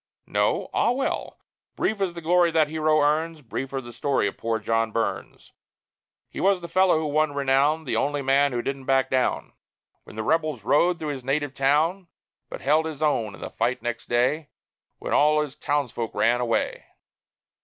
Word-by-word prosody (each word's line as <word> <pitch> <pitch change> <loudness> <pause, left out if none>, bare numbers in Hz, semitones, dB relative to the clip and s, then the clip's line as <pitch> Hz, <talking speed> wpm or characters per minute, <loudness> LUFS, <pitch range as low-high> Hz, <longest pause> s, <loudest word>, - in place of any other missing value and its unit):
No? - - 0
Ah, - - +2
well: 260 +3 -2 0.4
Brief 215 -2 -1
is 180 -3 -1
the 170 - -6
glory 175 +1 +4
that 160 -2 +2
hero 155 -1 +2
earns, 155 +2 0
Briefer 135 +3 -4
the 120 -1 -11
story 135 0 0
of 100 - -2
poor 115 0 -2
John 115 +1 0
Burns: 115 0 -4 0.8
He - - -9
was 195 -1 +3
the 170 - -7
fellow 185 0 +3
who 160 - -2
won 150 0 0
renown, 140 +3 +2
The 135 - -2
only 145 0 -1
man 140 +1 +3
who 120 -1 -2
didn't 135 -1 -4
back 135 0 +2
down 130 -1 0 0.5
When - - -13
the 110 - -3
rebels 155 -4 0
rode 170 +9 +3
through 155 -3 -4
his 135 -3 -5
native 140 +1 -1
town; 155 +8 +1 0.4
But - - -7
held 155 +3 +2
his 155 -1 -5
own 110 -9 0
in - - -15
the - - -6
fight 120 +3 -1
next 120 0 -4
day, 135 +6 +1 0.5
When - - -4
all 150 +1 +4
his 150 -2 -3
townsfolk 125 -6 -2
ran 120 +2 +2
away. 115 -2 -1
145 Hz, 185 wpm, -25 LUFS, 125-160 Hz, 0.8 s, glory